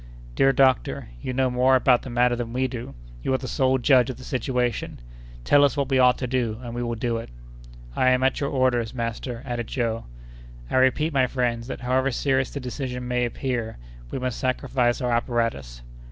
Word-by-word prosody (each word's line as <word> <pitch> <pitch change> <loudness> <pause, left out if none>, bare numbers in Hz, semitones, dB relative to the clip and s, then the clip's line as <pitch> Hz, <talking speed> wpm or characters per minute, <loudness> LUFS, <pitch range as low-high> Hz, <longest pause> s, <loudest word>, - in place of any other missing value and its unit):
"Dear 135 - +4
doctor, 130 - +2
you - - -3
know 130 0 +1
more 130 +1 +4
about 125 -1 +4
the - - -8
matter 120 0 +2
than 120 -1 -5
we 130 +1 +1
do; 120 - -7 0.3
you 130 - 0
are - - +2
the 130 0 -7
sole 130 +2 +2
judge 130 0 +4
of 130 - -5
the 130 - -11
situation. 125 - -2 0.4
Tell 145 - +5
us 140 0 +2
what 140 -1 0
we 135 -1 +3
ought 125 -1 +5
to 130 - -3
do, 120 -3 -1
and 120 -1 -6
we 120 - -3
will 120 -1 -2
do 115 0 -1
it." 115 - -7 0.7
"I 130 - +2
am 130 0 +2
at 130 -1 +2
your 140 - -1
orders, 130 -3 +1
master," 115 +1 -4
added 120 -3 -3
Joe. 115 -3 -2 0.7
"I - - +2
repeat, 145 +5 +2
my 130 -2 +3
friends, 120 -2 -1
that - - -6
however 130 +2 +1
serious 130 0 0
the 140 - -5
decision 125 -1 -5
may 125 0 +1
appear, 120 -2 -3 0.3
we - - -4
must 130 -2 -3
sacrifice 130 -1 0
our 125 -1 0
apparatus." 115 - -1
125 Hz, 205 wpm, -24 LUFS, 120-130 Hz, 0.7 s, Tell